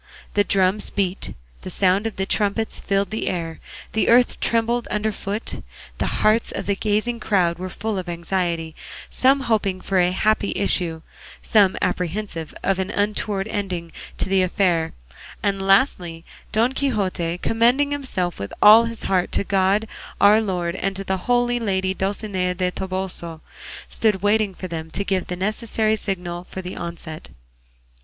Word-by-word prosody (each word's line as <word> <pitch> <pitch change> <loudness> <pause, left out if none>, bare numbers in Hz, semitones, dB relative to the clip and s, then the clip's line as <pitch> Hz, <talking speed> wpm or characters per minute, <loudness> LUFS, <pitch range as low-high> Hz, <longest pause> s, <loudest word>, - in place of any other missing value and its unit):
The 205 - +4
drums 195 +1 +2
beat, 190 -2 -2 0.3
the - - -7
sound 195 +3 +2
of 225 - -6
the 190 - -1
trumpets 210 +2 -1
filled 195 +1 0
the 220 - -2
air, 165 -2 -3 0.3
the 220 - +2
earth 245 +1 +5
trembled 235 +1 +1
under 210 +1 0
foot, 205 +2 -5 0.4
the - - 0 0.2
hearts 215 +2 +3
of 195 - -4
the 200 - +1
gazing 215 +4 0
crowd 180 -6 +1
were 185 0 -4
full 215 +1 -3
of 180 -1 -6
anxiety, 170 -1 -2 0.4
some 270 +2 +4
hoping 215 -6 0
for 190 0 0
a 175 0 +4
happy 210 +3 +1
issue, 170 -4 0 0.4
some 200 -4 +4
apprehensive 180 -2 -2
of 195 -1 +1
an 190 +1 -1
untoward 205 -1 -1
ending 180 -6 -3 0.3
to - - -1
the 190 0 +3
affair, 180 -3 +1 0.5
and 195 -1 0
lastly, 180 - +2 0.3
Don 230 +4 +2
Quixote, 195 -11 -1
commending 240 +8 +2
himself 210 - -2
with 100 0 -5
all 220 +3 +8
his 230 -1 -6
heart 185 -2 +1
to - - +1
God 195 +2 +2 0.3
our 210 +2 +6
Lord 180 -4 -2
and 195 +1 -2
to 195 - -4
the 190 -1 -2 0.4
lady 190 -3 0
Dulcinea 190 -2 -2
del 180 0 0
Toboso, 185 -4 -4 0.5
stood 210 -4 +2
waiting 205 -2 +2
for 185 - -6
them 160 -2 -5
to 200 - -2
give 190 -2 0
the 180 - -3
necessary 215 +3 0
signal 180 -4 -4
for 190 - -6
the 180 - -6
onset. 165 -2 -7
195 Hz, 160 wpm, -22 LUFS, 180-215 Hz, 0.5 s, all